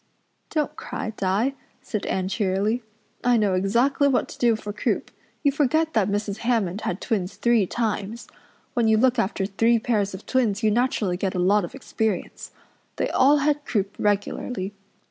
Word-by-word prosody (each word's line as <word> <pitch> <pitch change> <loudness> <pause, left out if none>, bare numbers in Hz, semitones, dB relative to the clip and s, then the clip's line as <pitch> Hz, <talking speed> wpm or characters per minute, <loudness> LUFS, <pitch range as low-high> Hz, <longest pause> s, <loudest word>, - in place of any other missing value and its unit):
"Don't 300 -3 -1
cry, 220 - -5
Di," 210 +6 0 0.3
said 215 - -4
Anne 185 -1 -1
cheerily. 200 +3 0 0.4
"I 245 -1 +4
know 205 -3 +2
exactly 235 +10 +2
what 265 -3 +2
to - - -11
do 235 -2 +4
for 210 -1 -6
croup. - - -1 0.3
You 285 - +4
forget 310 +3 +1
that 210 -3 +2
Mrs. 205 0 -2
Hammond 220 -5 0
had 180 - -2
twins 200 -5 -2
three 235 -5 +2
times. 225 0 -3 0.5
When 235 -3 +2
you 220 0 +4
look 255 +1 +3
after 195 -2 0
three 225 +4 +2
pairs 210 -4 0
of 190 - -11
twins 230 -5 +1
you 215 - +4
naturally 215 -6 +1
get 190 0 -2
a - - -1
lot 195 +3 +3
of 175 - -6
experience. 220 -7 -3 0.5
They - - -1
all 280 +3 +5
had 295 -1 +1
croup 200 -7 -1
regularly. 205 0 -1
220 Hz, 170 wpm, -24 LUFS, 195-245 Hz, 0.5 s, all